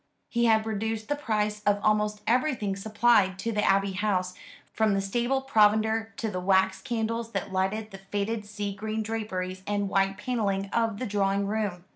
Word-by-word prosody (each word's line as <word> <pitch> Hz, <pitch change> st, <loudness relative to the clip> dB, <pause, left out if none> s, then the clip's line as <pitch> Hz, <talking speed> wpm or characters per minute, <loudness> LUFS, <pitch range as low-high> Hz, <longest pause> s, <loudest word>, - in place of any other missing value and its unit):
He 235 Hz, 0 st, +1 dB
had 220 Hz, -1 st, +4 dB
reduced 220 Hz, +1 st, -3 dB
the 290 Hz, -, +1 dB
price 210 Hz, -6 st, -1 dB
of 205 Hz, -1 st, +2 dB
almost 210 Hz, 0 st, +1 dB
everything 235 Hz, -5 st, +1 dB
supplied 210 Hz, -2 st, +3 dB
to 230 Hz, +4 st, -2 dB
the 210 Hz, -1 st, 0 dB
Abbey 195 Hz, 0 st, +3 dB
House, 185 Hz, -2 st, 0 dB, 0.4 s
from 220 Hz, -2 st, +2 dB
the -, -, +1 dB
stable 240 Hz, +7 st, 0 dB
provender 220 Hz, -2 st, +3 dB
to 220 Hz, -2 st, -2 dB
the 185 Hz, -, -3 dB
wax 190 Hz, +1 st, +2 dB
candles 230 Hz, -1 st, -2 dB
that 190 Hz, -, -3 dB
lighted 205 Hz, +4 st, -1 dB
the 195 Hz, -, -9 dB
faded 205 Hz, +3 st, -3 dB
sea 205 Hz, -1 st, -4 dB
green 215 Hz, +2 st, -3 dB
draperies 185 Hz, -4 st, -4 dB
and 205 Hz, -1 st, 0 dB
white 195 Hz, 0 st, +1 dB
panelling 200 Hz, -4 st, -1 dB
of 225 Hz, -3 st, +1 dB
the 255 Hz, -, -3 dB
drawing 200 Hz, -2 st, +1 dB
room. 200 Hz, -4 st, -2 dB
210 Hz, 175 wpm, -27 LUFS, 195-225 Hz, 0.4 s, had